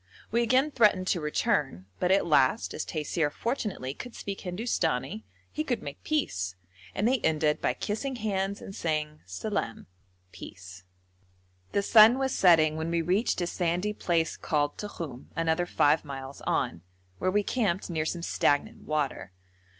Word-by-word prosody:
We 235 +2 +2
again 255 +5 +3
threatened 210 -7 +4
to 175 - +1
return, 150 - 0
but 180 - +2
at 195 - +4
last, 155 - +3
as - - -3
Taisir 155 -1 -1
fortunately 210 - -3
could 245 - -9
speak 200 -1 -5
Hindustani, 175 - -2 0.3
he 310 - -2
could 245 -6 -2
make 140 0 -8
peace, 95 - -1 0.4
and 210 - +1
they 260 +1 +3
ended 155 -3 +1
by 125 - +1
kissing 255 - -3
hands 200 -3 -2
and 195 - -8
saying 155 -2 -2
salaam 115 - -3 0.5
(peace). 95 -1 -11 0.9
The 200 - +2
sun 225 +3 +8
was 265 -1 0
setting 160 -4 +5
when 160 +1 -2
we 170 0 0
reached 185 +4 +1
a - - +1
sandy 175 +4 -1
place 170 -5 0
called 145 -1 0
Tokhum 165 -11 -7
(another 165 +1 +1
5 150 -2 +3
miles 135 -1 -8
on), 85 - 0 0.4
where - - +1
we 205 +2 +2
camped 200 -6 0
near 160 -3 -1
some 170 +1 -3
stagnant 145 -4 +1
water. 150 -10 -2
170 Hz, 155 wpm, -28 LUFS, 150-210 Hz, 0.9 s, sun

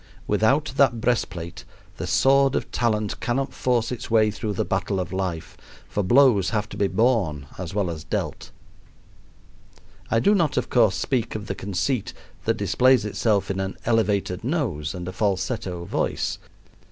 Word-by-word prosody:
Without 130 +8 +2
that 130 -4 +4
breast 120 0 +1
plate 85 -1 -8 0.3
the - - -4
sword 135 0 +4
of - - -2
talent 110 -3 0
cannot 130 +2 -1
force 120 -2 0
its 125 - -5
way 110 -2 +4
through 105 +1 -3
the - - -1
battle 95 +1 -1
of 90 +1 -4
life, 90 -4 -3 0.3
for 105 - -1
blows 120 -1 +4
have 105 -2 -1
to - - -8
be 100 - +1
borne 95 - +1
as 90 0 -5
well 100 -3 +1
as 80 -2 -5
dealt. - - -4 1.6
I 115 - +3
do 200 - +4
not, 165 -8 +1
of - - -1
course, 110 -6 +4
speak 120 -5 -1
of 105 -1 -4
the 100 - -3
conceit 100 +5 -2 0.3
that - - +1
displays 130 -3 +3
itself 105 -1 0
in 95 - -3
an 95 0 -3
elevated 105 -5 +1
nose 110 - -2
and 90 -1 -6
a 90 - -5
falsetto 95 -3 -2
voice. - - -2
105 Hz, 165 wpm, -24 LUFS, 95-120 Hz, 1.6 s, that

